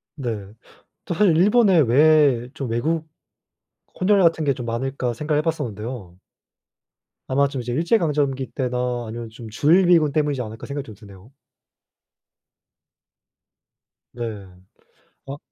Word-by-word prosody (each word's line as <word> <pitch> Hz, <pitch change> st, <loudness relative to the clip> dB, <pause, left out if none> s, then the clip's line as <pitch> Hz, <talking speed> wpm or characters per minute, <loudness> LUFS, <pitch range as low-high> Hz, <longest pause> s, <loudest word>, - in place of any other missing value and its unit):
네. 110 Hz, -8 st, -5 dB, 0.5 s
또 -, -, -3 dB
사실 180 Hz, -2 st, +3 dB
일본에 200 Hz, 0 st, +4 dB
왜 140 Hz, -2 st, +4 dB
좀 135 Hz, -4 st, -5 dB
외국 155 Hz, +8 st, -1 dB, 0.9 s
혼혈 200 Hz, +2 st, +4 dB
같은 165 Hz, -2 st, +2 dB
게 140 Hz, -, +2 dB
좀 125 Hz, -3 st, -7 dB
많을까 125 Hz, +1 st, -2 dB
생각을 150 Hz, +4 st, -1 dB
해 -, -, -3 dB
봤었는데요. 120 Hz, -, -5 dB, 1.1 s
아마 140 Hz, +2 st, +2 dB
좀 135 Hz, -2 st, -5 dB
이제 120 Hz, 0 st, -5 dB
일제강점기 150 Hz, -, 0 dB
때나 125 Hz, -2 st, -2 dB
아니면 115 Hz, +1 st, -7 dB
좀 115 Hz, 0 st, -11 dB
주일미군 165 Hz, -, +4 dB
때문이지 145 Hz, -3 st, 0 dB
않을까 110 Hz, -1 st, -8 dB
생각이 140 Hz, 0 st, -5 dB
좀 110 Hz, -, -11 dB
드네요. 100 Hz, +3 st, -16 dB, 2.8 s
네. 115 Hz, -4 st, -6 dB, 0.8 s
아. 140 Hz, +1 st, -6 dB
135 Hz, 250 characters per minute, -22 LUFS, 115-155 Hz, 2.8 s, 일본에